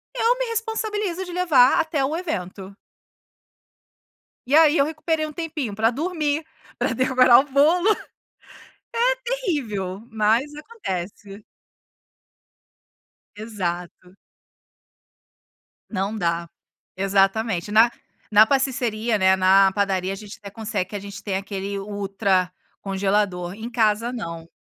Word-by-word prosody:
Eu - - +2
me - - 0
responsabilizo 435 -5 -2
de 360 - -8
levar 305 -9 +4
até 315 -3 0
o 285 +4 -1
evento. 195 - -5 1.7
E 275 - +3
aí, 320 0 +6
eu 280 - +4
recuperei 315 +1 -2
um 305 - -8
tempinho 305 -9 -4
pra 220 +2 +2
dormir, 310 +1 -1 0.3
pra - - 0
decorar 255 -1 +5
o - - +2
bolo. 320 +7 +3
É 430 - 0 1.4
terrível, 210 - -3
mas 225 +6 +1
acontece. 205 - -7 1.9
Exato. 180 -4 -5 1.7
Não 200 +1 -2
dá, 170 -3 -1 0.5
exatamente 195 +1 +1
na 220 +3 +6 0.4
na 210 +1 +7
pasticceria, 240 -4 0
né, 190 -1 +4
na 190 +1 +5
padaria 195 -2 0
a - - -5
gente 205 +1 -10
até 200 -1 -11
consegue 210 -3 -4
a - - -3
gente 200 0 -9
tem 200 -3 -2
aquele 195 0 -4
ultra 195 -2 -1 0.3
congelador, 195 -2 -1
em 225 +3 -7
casa 230 +1 +1
não. 165 -9 -6
215 Hz, 115 wpm, -23 LUFS, 195-290 Hz, 1.9 s, na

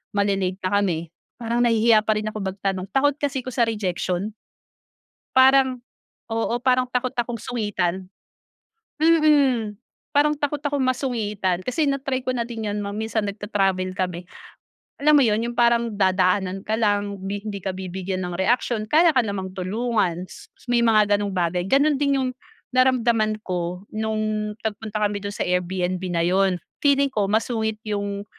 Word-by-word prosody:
mali-late 195 -2 +1
na 185 - 0
kami, 170 -4 -2 0.3
parang 235 +1 -1
nahihiya 225 -2 +4
pa 215 - +3
rin 215 - -4
ako 215 - -6
magtanong, 195 -1 -3
takot 285 +3 +2
kasi 270 -3 -2
'ko 255 - -6
sa 235 -2 +2
rejection. 195 -1 -2 1.0
Parang, 260 -1 +5 0.5
oo, 225 +1 0
parang 255 0 +2
takot 250 0 -1
akong 240 -1 -2
sungitan. 190 -6 -2 0.9
Mm, 285 -10 +3 0.4
parang 300 +1 +3
takot 290 0 -1
akong 285 -2 -1
masungitan, 215 -8 -1
kasi 285 +4 0
na-try 270 -1 -1
ko 255 - -4
na 235 -1 -1
din 225 -3 -5
'yon 205 - -2
ma 200 - -4
minsan 220 0 -2
nagta-travel 195 -2 -1
kami, 180 -1 -3 0.7
alam 300 +1 +5
mo 275 - +5
'yon, 215 0 +2
yung 240 0 -5
parang 235 -1 +3
dadaanan 190 0 +1
ka 215 - 0
lang, 205 -2 0
bi 200 +1 -3
hindi 205 -2 -5
ka 190 - -1
bibigyan 185 0 -4
ng 180 -1 -4
reaksyon, 220 +2 +1
kaya 330 +5 +5
ka 255 - +5
namang 190 -2 -4
tulungan. 190 -2 -1
S - - -13
s - - -22
may 240 -1 +3
mga 210 -2 +4
gano'ng 205 -1 -3
bagay, 175 0 0
gano'n 280 +5 +3
din 280 -1 +1
yung 255 - 0 0.5
naramdaman 235 -4 +3
ko, 180 0 -3
no'ng 215 -1 -2
nagpunta 215 0 -4
kami 205 0 -4
dun 200 0 -4
sa - - -1
Airbnb 180 0 -1
na 170 - +1
yun. 190 +1 +2 0.3
Feeling 280 -1 +4
ko 210 -4 0
masungit 220 0 0
yung, 200 -1 -3
215 Hz, 160 wpm, -23 LUFS, 190-245 Hz, 1.0 s, Parang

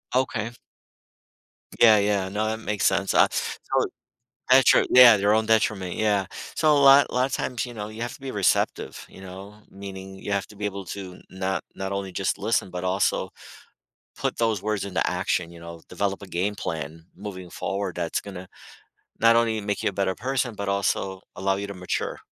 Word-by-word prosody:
Okay. 120 -3 0 1.3
Yeah, 110 -2 +8
yeah, 100 -2 +1
no, 105 +2 -1
that 110 +1 -2
makes 105 -3 -2
sense, - - +2
uh, - - +6
so - - -1 0.6
detri 130 +1 +6
yeah, 125 -3 +9
their 100 +1 +2
own 110 0 +2
detriment, 105 -5 +1
yeah. 105 -3 +1 0.3
So 155 - +3
a - - +5
lot 140 0 +7
lotta 130 +1 +1
times, 125 -2 -2
you 125 - -8
know, 105 -2 -5
you 110 +2 -7
have 120 - -4
to - - -14
be 135 -1 -5
receptive, 100 -6 0
you - - -14
know? 95 +2 -10 0.2
Meaning, 95 -1 -9
you 100 - -5
have 100 -1 0
to 105 - -15
be 105 - -6
able 100 -1 -5
to 95 -1 -8
not 95 0 -3
not 95 0 -4
only 100 -1 -4
just - - -1
listen; - - 0
but 90 0 -5
also 95 +1 0 0.9
put - - -2
those 115 -4 +1
words 105 -1 -2
into 90 -4 -1
action, 85 -1 -1
you 85 - -12
know, 85 0 -10
develop 100 +2 -2
a 100 - -9
game 95 +4 -1
plan 80 -3 -5
moving 95 -2 -8
forward 90 +1 -3
that's 85 -1 -2
gonna 95 -2 -9 0.7
not 115 0 +6
only 115 -1 +2
make 100 -1 -2
you - - +1
a - - -6
better 95 -1 0
person, 130 0 -1
but 100 -1 -3
also 100 -1 -1
allow 95 +1 0
you 100 +1 -4
to 100 - -6
mature. 90 -1 -3
100 Hz, 190 wpm, -25 LUFS, 95-110 Hz, 1.3 s, yeah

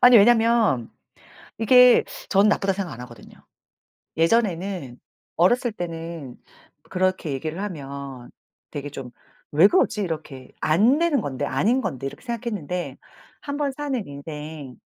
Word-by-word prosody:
아니 245 -1 +8
왜냐면 225 - +4 0.7
이게 250 +2 +7 0.2
전 200 +1 +4
나쁘다고 195 -2 +2
생각 195 -3 -4
안 115 - -9
하거든요. 120 -3 -13 0.8
예전에는 180 - 0 0.4
어렸을 240 +7 +3
때는 165 - -6 0.5
그렇게 185 -4 0
얘기를 155 +6 -4
하면 140 -8 -7 0.4
되게 145 -1 -5
좀 135 -3 -8 0.4
'왜 160 +6 +7
그러지?' 210 0 +2
이렇게 150 -7 -6
'안 215 - +4
되는 330 -5 +2
건데. 145 -4 -3
아닌 205 - +1
건데.' 135 - -4
이렇게 - - -10
생각했는데 210 - -4 0.4
1번 285 0 -2
사는 270 - -3
인생 150 -2 -8
175 Hz, 275 characters per minute, -24 LUFS, 145-225 Hz, 0.8 s, 아니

